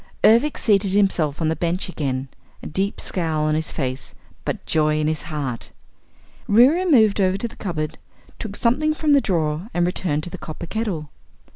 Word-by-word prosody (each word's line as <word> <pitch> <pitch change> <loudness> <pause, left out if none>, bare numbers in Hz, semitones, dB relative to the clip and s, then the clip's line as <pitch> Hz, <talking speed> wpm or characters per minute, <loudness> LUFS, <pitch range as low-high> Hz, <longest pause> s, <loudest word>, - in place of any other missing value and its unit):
Ervic 235 +7 +5
seated 200 -3 +2
himself 175 -7 +1
on 155 - +2
the 160 - 0
bench 175 +4 -1
again, 135 -6 -3 0.4
a - - -8
deep 195 +5 -1
scowl 160 -4 -1
on 155 0 +1
his 155 +1 -1
face 130 -2 -4 0.3
but - - -3
joy 155 -1 +2
in 155 - 0
his 155 0 -1
heart. 145 -7 -4 0.8
Reera 280 - +5
moved 220 -8 +5
over 190 0 +2
to 235 - -2
the - - -14
cupboard, 155 -6 -4 0.4
took 210 -3 -6
something 300 +8 +1
from 305 -2 +2
the 280 - +5
drawer 160 -2 -1
and 175 0 +3
returned 170 -4 -1
to 175 - -6
the 185 - -7
copper 160 +2 -7
kettle. 175 -7 -3
175 Hz, 180 wpm, -22 LUFS, 155-215 Hz, 0.8 s, Ervic